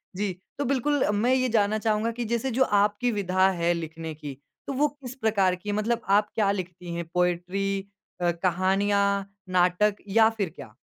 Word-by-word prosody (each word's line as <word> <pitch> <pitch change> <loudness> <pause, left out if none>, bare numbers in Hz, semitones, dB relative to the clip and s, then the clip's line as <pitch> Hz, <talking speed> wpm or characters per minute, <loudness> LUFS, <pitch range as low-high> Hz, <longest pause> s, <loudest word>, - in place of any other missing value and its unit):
जी, 200 -1 -1 0.2
तो 285 - -1
बिल्कुल 275 +2 +1
मैं 235 +5 +2
ये 255 -1 +2
जानना 215 -1 +2
चाहूँगा 220 +1 0
कि 235 0 -4
जैसे 235 +3 -1
जो 260 +3 +3 0.2
आपकी 210 +4 +1
विधा 190 -2 +2
है 175 -2 +1
लिखने 160 -1 -5
की, 145 -3 -8 0.3
तो 280 - -2
वो 295 +3 +3
किस 270 -4 -10
प्रकार 205 -7 +2
की 205 +3 -8
है? 205 - 0
मतलब 230 +2 0 0.2
आप 210 0 +1
क्या 205 -3 +2
लिखती 180 -2 -5
है 170 - -2
पोएट्री 180 +3 0 0.4
अ, 175 0 +3
कहानियाँ, 195 +3 +1 0.2
नाटक 185 +3 +3
या 220 +2 +5
फिर 195 -5 -1
क्या? 110 - -11
200 Hz, 180 wpm, -26 LUFS, 180-225 Hz, 0.4 s, या